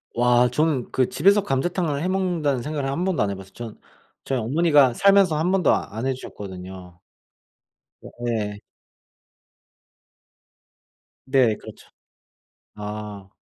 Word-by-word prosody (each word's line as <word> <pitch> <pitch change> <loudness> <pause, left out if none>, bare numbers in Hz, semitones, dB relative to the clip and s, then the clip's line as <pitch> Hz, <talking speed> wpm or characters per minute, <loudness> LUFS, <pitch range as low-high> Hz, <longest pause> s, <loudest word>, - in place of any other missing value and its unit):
와. 120 0 +4
저는 150 -2 0
그 130 -2 +1
집에서 200 +6 +3
감자탕을 155 0 -1
해 - - 0
먹는다는 175 -8 0
생각을 145 0 -3
1 165 +6 -2
번도 185 - +1
안 100 - -1
해 100 - -3
봤어요. 95 0 -12
저는 115 -2 -9 0.4
저희 135 -2 -1
어머니가 145 +1 +3
살면서 195 -2 +4
1 175 +4 +1
번도 190 -5 +3
아 - - -3
안 115 - -3
해 135 - +1
주셨거든요. 95 -6 -9 1.0
어 - - -10 0.2
예. 105 -3 -2 2.7
네 130 -6 +3
그렇죠. - - -13 0.9
아. 105 -1 -7
130 Hz, 240 characters per minute, -23 LUFS, 105-160 Hz, 2.7 s, 와